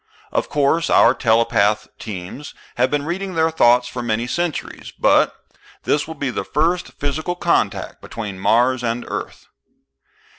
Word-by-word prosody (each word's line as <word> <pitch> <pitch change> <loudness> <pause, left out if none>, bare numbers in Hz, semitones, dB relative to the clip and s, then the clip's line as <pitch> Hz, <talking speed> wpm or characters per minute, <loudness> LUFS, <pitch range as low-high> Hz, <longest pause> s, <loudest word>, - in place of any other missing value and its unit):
Of - - -1
course 150 +3 +1
our 120 - +6
telepath 115 -3 +2
teams 105 +7 -7 0.2
have 125 +2 +3
been 145 0 -1
reading 185 +2 -3
their 160 0 +2
thoughts 125 -5 +4
for 125 0 -5
many 115 0 -1
centuries, 170 +6 -3
but - - +3 0.5
this 145 - 0
will 160 - -7
be 140 -3 -2
the - - -3
first 165 - 0
physical 155 +5 -3
contact - - 0
between 105 -4 -6
Mars 120 +5 +2
and 120 +1 -2
Earth." - - -6
130 Hz, 145 wpm, -20 LUFS, 115-160 Hz, 0.5 s, our